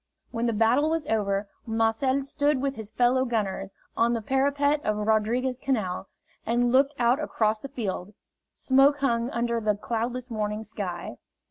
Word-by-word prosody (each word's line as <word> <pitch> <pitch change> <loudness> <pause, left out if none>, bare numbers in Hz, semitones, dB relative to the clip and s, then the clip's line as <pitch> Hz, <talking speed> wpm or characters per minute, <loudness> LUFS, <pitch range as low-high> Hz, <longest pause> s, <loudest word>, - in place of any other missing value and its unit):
When 235 0 -1
the 230 - +1
battle 235 +8 +3
was 325 -1 -1
over, 200 -2 0 0.2
Marcel 225 +5 +1
stood 285 0 +1
with 275 0 -1
his 220 -2 -7
fellow 250 +3 +2
gunners 200 -5 -2 0.2
on 235 +1 +2
the 230 - -1
parapet 285 +3 +1
of 215 0 0
Rodriguez 220 +4 +1
Canal 215 -10 -2 0.3
and 240 +1 +1
looked 275 +3 +3
out 245 +2 +3
across 220 -7 0
the 275 - -8
field 210 -6 -4 0.4
smoke 275 +2 +3
hung 235 -3 +1
under 235 -1 -1
the 210 -1 +1
cloudless 240 +4 -3
morning 210 -1 -2
sky. 180 - -5
235 Hz, 155 wpm, -26 LUFS, 215-265 Hz, 0.4 s, battle